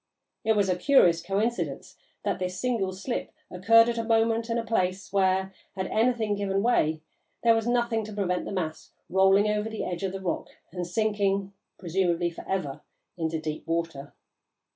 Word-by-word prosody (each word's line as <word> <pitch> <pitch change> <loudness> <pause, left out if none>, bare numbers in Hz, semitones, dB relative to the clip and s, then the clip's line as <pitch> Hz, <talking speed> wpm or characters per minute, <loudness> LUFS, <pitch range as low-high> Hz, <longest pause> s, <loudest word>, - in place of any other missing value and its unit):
It 220 - +3
was 205 -2 +2
a 185 - +2
curious 180 -6 +4
coincidence 205 +7 -2 0.3
that - - -1
this 185 0 -3
single 230 -6 0
slip 195 +7 -4 0.2
occurred 225 +6 +5
at 235 -1 -1
a - - -1
moment 225 0 +2
and 230 - 0
a 230 - -1
place 190 -4 -1
where, 190 0 +2 0.2
had 190 -1 -2
anything 225 -2 +2
given 200 -1 -1
way, 155 -10 +2 0.4
there 230 -1 +6
was 225 0 0
nothing 235 -2 +1
to 215 - -8
prevent 180 -3 -1
the - - -5
mass 165 -5 -4 0.2
rolling 195 +2 +5
over 210 +1 0
the 220 - -4
edge 175 0 -4
of 195 -1 -1
the 195 - -4
rock 190 -2 -3 0.2
and 180 -2 -4
sinking, 200 -1 0 0.2
presumably 175 -1 0
for 170 - -9
ever, 170 -8 -2 0.3
into 160 -2 -2
deep 155 +1 -5
water. 165 -4 -3
195 Hz, 175 wpm, -27 LUFS, 180-225 Hz, 0.4 s, there